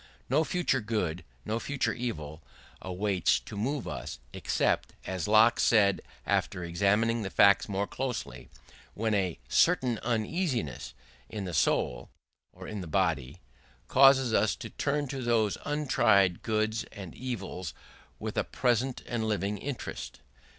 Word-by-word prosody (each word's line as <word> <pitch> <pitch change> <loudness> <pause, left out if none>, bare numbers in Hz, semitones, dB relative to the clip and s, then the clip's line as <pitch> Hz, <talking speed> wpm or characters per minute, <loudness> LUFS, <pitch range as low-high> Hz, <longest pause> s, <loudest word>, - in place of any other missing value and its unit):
No 160 - +4
future 165 -6 0
good, 90 -6 -2 0.2
no 110 +2 -1
future 140 +2 -1
evil 80 -11 -5 0.4
avails 95 0 +1
to - - -10
move 130 +6 -2
us, - - -5 0.2
except - - 0
as 90 -3 -3
Locke 110 +3 +5
said 100 -4 +4 0.2
after 90 - 0
examining 100 +7 +1
the 100 - -3
facts 100 +2 +5
more 100 0 0
closely 125 - -5 0.5
when 110 +1 0
a 95 -4 0
certain 120 - +3
uneasiness 115 - -2 0.3
in 105 -3 -5
the 90 - -5
soul 60 -4 +1 0.4
(or - - -11
in 105 -2 -5
the 90 - -7
body) 80 -3 0 0.5
causes 135 -2 +6
us 110 -1 +3
to 115 -3 -8
turn 145 0 -1
to 135 0 -4
those 115 -4 +1
untried 110 - +3
goods 110 0 0
and 95 -6 -10
evils 95 - -5 0.4
with - - -5
a - - +1
present 125 +1 0
and 115 -2 -2
living 105 -1 -1
interest. 140 +1 -6
110 Hz, 135 wpm, -29 LUFS, 95-120 Hz, 0.5 s, causes